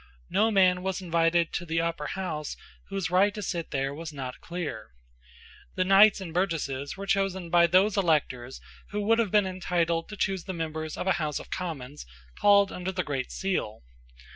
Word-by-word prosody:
No 220 Hz, +2 st, +3 dB
man 185 Hz, -3 st, +4 dB
was 190 Hz, 0 st, -2 dB
invited 170 Hz, -1 st, +1 dB
to 175 Hz, -, -2 dB
the 165 Hz, -1 st, -1 dB
Upper 165 Hz, -3 st, -2 dB
House 160 Hz, -6 st, -4 dB, 0.3 s
whose 195 Hz, -4 st, -3 dB
right 195 Hz, +3 st, +4 dB
to 210 Hz, -, -5 dB
sit 170 Hz, -3 st, -3 dB
there 135 Hz, 0 st, -1 dB
was 160 Hz, +2 st, -7 dB
not 130 Hz, -3 st, -7 dB
clear. 160 Hz, -, -6 dB, 0.8 s
The 185 Hz, -, +1 dB
knights 195 Hz, +2 st, +6 dB
and 175 Hz, -4 st, -7 dB
burgesses 160 Hz, -6 st, -2 dB
were 200 Hz, -, -5 dB
chosen 190 Hz, -3 st, 0 dB
by 170 Hz, -1 st, +6 dB
those 195 Hz, +4 st, +3 dB
electors 140 Hz, -8 st, 0 dB, 0.3 s
who 210 Hz, +1 st, -2 dB
would 225 Hz, +3 st, +3 dB
have 225 Hz, -3 st, +2 dB
been 210 Hz, 0 st, +4 dB
entitled 170 Hz, -3 st, -1 dB
to 210 Hz, -, -8 dB
choose 190 Hz, -2 st, -1 dB
the 190 Hz, -, -4 dB
members 160 Hz, -2 st, -4 dB
of -, -, -3 dB
a 190 Hz, -, +3 dB
House 150 Hz, -2 st, -1 dB
of -, -, -9 dB
Commons 150 Hz, -, -5 dB, 0.3 s
called 200 Hz, -1 st, +5 dB
under 180 Hz, +1 st, -4 dB
the 185 Hz, -1 st, -2 dB
great 135 Hz, -4 st, -3 dB
seal. 180 Hz, -, -2 dB
175 Hz, 185 wpm, -27 LUFS, 155-195 Hz, 0.8 s, knights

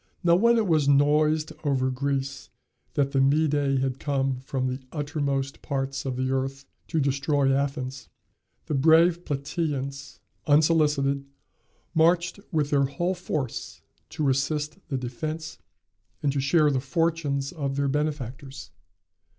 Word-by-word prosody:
Now 170 Hz, -1 st, +5 dB
when 235 Hz, +5 st, +4 dB
it 225 Hz, -, +2 dB
was 155 Hz, -6 st, +2 dB
noised 150 Hz, +2 st, +3 dB
over 130 Hz, -3 st, +1 dB
Greece 135 Hz, +1 st, -3 dB, 0.5 s
that 140 Hz, -1 st, +1 dB
the 135 Hz, -, +2 dB
Mede 140 Hz, -1 st, +2 dB
had 135 Hz, -1 st, -2 dB
come 135 Hz, -3 st, -1 dB
from 130 Hz, 0 st, -3 dB
the 130 Hz, +1 st, -2 dB
uttermost 145 Hz, -3 st, -2 dB
parts 135 Hz, 0 st, -3 dB
of 130 Hz, -2 st, -2 dB
the 130 Hz, +1 st, -1 dB
earth 135 Hz, +1 st, -2 dB, 0.2 s
to 160 Hz, -, 0 dB
destroy 140 Hz, 0 st, +1 dB
Athens, 135 Hz, -1 st, -2 dB, 0.6 s
the -, -, -3 dB
brave 165 Hz, +5 st, +4 dB
Platæans, 140 Hz, -1 st, -3 dB, 0.3 s
unsolicited, 145 Hz, -2 st, +3 dB, 0.7 s
marched 170 Hz, +3 st, +2 dB
with 150 Hz, -4 st, 0 dB
their 140 Hz, -1 st, +3 dB
whole 175 Hz, +7 st, -1 dB
force 155 Hz, -8 st, -4 dB, 0.3 s
to 150 Hz, -3 st, 0 dB
assist 150 Hz, +5 st, -1 dB
the 135 Hz, -, -2 dB
defence, 155 Hz, +6 st, -5 dB, 0.6 s
and 145 Hz, -, +2 dB
to 140 Hz, -, 0 dB
share 150 Hz, +2 st, +3 dB
the 135 Hz, -, +1 dB
fortunes 145 Hz, -1 st, -1 dB
of 140 Hz, -6 st, -3 dB
their 140 Hz, 0 st, 0 dB
benefactors. 135 Hz, -6 st, -3 dB
140 Hz, 135 wpm, -26 LUFS, 135-155 Hz, 0.7 s, Now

